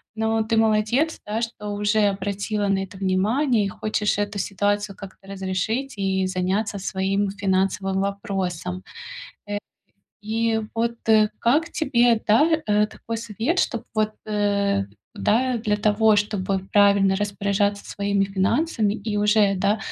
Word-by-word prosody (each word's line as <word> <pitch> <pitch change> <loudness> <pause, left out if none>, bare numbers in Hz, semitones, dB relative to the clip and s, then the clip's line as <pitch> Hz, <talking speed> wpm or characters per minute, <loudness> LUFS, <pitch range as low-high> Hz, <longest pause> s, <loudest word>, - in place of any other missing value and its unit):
но 220 0 +1
ты 220 +1 0
молодец, 225 +8 +2
да, 215 +2 -2
что 225 -3 -5
уже 205 +1 +2
обратила 200 +1 -2
на 195 -1 +2
это 195 0 -10
внимание 210 +6 +1
и - - 0
хочешь 210 +1 -1
эту 205 0 -2
ситуацию 205 +1 -1
как-то 195 -1 -12
разрешить 195 +7 -2
и 190 -1 0
заняться 190 +3 -1
своим 195 +1 -1
финансовым 195 -1 0
вопросом. 195 - -3 1.2
Э, 210 - -25
и 225 0 +1
вот, 235 +1 -1
э, 215 -1 +5
как 300 +8 +2
тебе, 240 -6 +2
да, 230 +9 +5 0.2
э, 210 0 +3
такой 230 +1 -6
совет, 230 - -1
чтоб 235 - -2
вот, 215 0 +1
э, 200 - +1 0.3
да, 245 - +1
для 210 -2 0
того, 210 +1 +3
чтобы 200 -2 0
правильно 200 -1 +4
распоряжаться 200 0 -1
своими 200 -1 0
финансами 205 - 0
и 210 0 -4
уже, 205 -1 +3
да, 200 +3 +1
205 Hz, 135 wpm, -23 LUFS, 195-220 Hz, 1.2 s, э